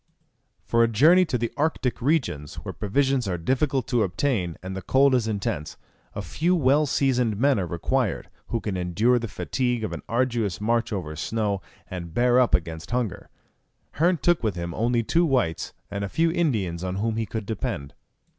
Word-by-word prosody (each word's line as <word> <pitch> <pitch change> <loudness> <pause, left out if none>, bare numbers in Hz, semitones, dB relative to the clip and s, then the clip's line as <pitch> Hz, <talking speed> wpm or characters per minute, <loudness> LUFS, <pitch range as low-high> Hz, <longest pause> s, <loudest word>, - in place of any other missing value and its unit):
For 115 - +2
a 115 - +5
journey 155 - +5
to 140 -7 -1
the 115 0 -2
Arctic 145 -5 -1
regions, 120 - 0
where - - -6
provisions 130 +3 0
are 90 -2 -1
difficult 130 - 0
to 120 -3 +2
obtain, 95 - 0
and 95 0 -5
the 95 - -4
cold 135 +8 +4
is 120 -3 +2
intense, 100 -8 -3 0.4
a - - -4
few 175 +3 +1
well 145 -1 +3
seasoned 125 -6 +1
men 135 0 +3
are 90 - -2
required, 85 -1 -1 0.2
who 115 - -1
can 100 -4 -3
endure 105 +8 +2
the 115 - -4
fatigue 125 +2 -2
of 110 - -3
an - - -5
arduous 115 -5 0
march 115 +3 0
over 85 -7 -4
snow, 100 +3 -1 0.3
and 85 -2 -7
bear 125 +1 +4
up 125 - +4
against 80 -1 -4
hunger. 120 -5 -2 0.6
Hearn 175 +3 +2
took 175 +1 +2
with 110 -4 -1
him 85 -1 -4
only 120 +3 +1
two 165 +10 +2
whites, 130 - 0 0.2
and 100 0 -3
a 100 - -3
few 165 - +2
Indians 105 - 0
on 90 0 -2
whom 110 +3 -1
he 115 -1 -1
could 110 -2 -4
depend. 75 -9 -4
115 Hz, 185 wpm, -25 LUFS, 95-130 Hz, 0.6 s, a